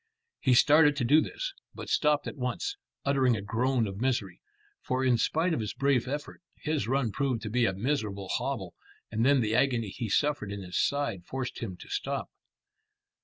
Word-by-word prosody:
He 130 -3 +3
started 150 +3 +6
to 130 -4 -1
do 150 +6 +6
this, - - -4 0.2
but - - -7
stopped 150 -1 +2
at - - -5
once, 130 - -2 0.3
uttering 135 -3 +3
a - - -4
groan 120 +4 +1
of 100 +1 -6
misery, 120 -9 -1 0.4
for 130 +1 -1
in 125 -2 +4
spite 165 +7 +1
of - - 0
his 105 -3 -4
brave 135 -3 +2
effort, 145 +6 -5 0.2
his 155 -8 -2
run 130 -3 +1
proved 130 -2 -1
to 105 - -4
be 120 0 +3
a 95 - 0
miserable 105 -3 -2
hobble, - - -2 0.4
and 110 +1 0
then 135 0 +5
the 110 -1 0
agony 120 -3 +2
he 110 +3 -5
suffered 145 -2 +1
in 100 -1 -5
his 90 -1 -1
side 130 -11 -1
forced 130 -1 -4
him 95 -6 -5
to - - -12
stop. - - -3
125 Hz, 190 wpm, -29 LUFS, 110-140 Hz, 0.4 s, started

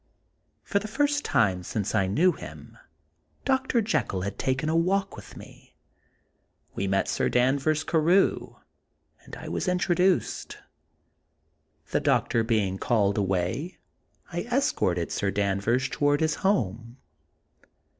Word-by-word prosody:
For 200 - 0
the 210 - -6
first 290 +5 0
time 95 -4 +1
since 100 +3 -3
I 95 - +2
knew 165 - +3
him. - - -11 0.7
Dr. 265 -3 +1
Jekyll 100 - -1
had 100 - -5
taken 135 +3 -1
a 160 - +1
walk 195 +4 +1
with - - -12
me. - - -15 1.0
We 100 - -2
met 95 0 +1
Sir - - 0
Danvers 140 +5 +2
Carew, 170 +5 +2 0.7
and - - -10
I - - -9
was - - -3
in 180 0 +2
troduced. 180 +1 0 1.4
The - - +2
doctor 115 - +1
being 105 -5 0
called 105 -4 +1
away, 95 - -2 0.6
I 175 - -1
escorted 90 - 0
Sir 100 - -1
Danvers 100 +6 0
toward 145 +1 +1
his 160 -1 +2
home. 115 - -1
135 Hz, 125 wpm, -26 LUFS, -, 1.4 s, knew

